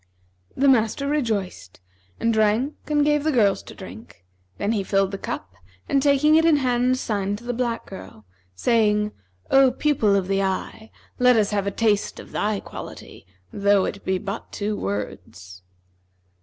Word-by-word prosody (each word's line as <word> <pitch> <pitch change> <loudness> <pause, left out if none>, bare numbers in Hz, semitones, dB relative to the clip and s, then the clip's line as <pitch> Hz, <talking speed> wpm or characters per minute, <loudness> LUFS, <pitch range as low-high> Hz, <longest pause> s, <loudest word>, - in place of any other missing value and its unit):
The 280 - +3
master 255 +2 +2
rejoiced 215 - -2 0.4
and 230 0 +1
drank 220 +6 +2
and 295 -1 +2
gave 295 -1 +2
the 315 - +1
girls 210 -7 +2
to - - -12
drink; 190 - -12 0.3
then 205 - -1
he 210 -3 0
filled 195 0 +1
the 195 - -5
cup 90 -2 -6 0.3
and 275 - +2
taking 285 +2 +4
it 320 +1 +5
in 330 -2 +5
hand, 250 -1 +1
signed 205 -4 -2
to 230 - -15
the 245 0 -3
black 235 -1 -2
girl, 110 - -11 0.3
saying, 210 - +2 0.4
'O 270 -1 +6
pupil 250 -7 +1
of 190 -2 0
the 195 0 +1
eye, 195 +3 -3 0.3
let 250 0 +5
us 210 -2 +2
have 200 -1 -1
a - - +3
taste 210 0 0
of - - -12
thy 210 -1 -1
quality, - - -10 0.3
though 200 -1 +3
it 200 - -5
be 190 0 0
but 200 +3 -6
two 210 +1 -3
words.' 95 - -6
215 Hz, 170 wpm, -23 LUFS, 195-255 Hz, 0.4 s, O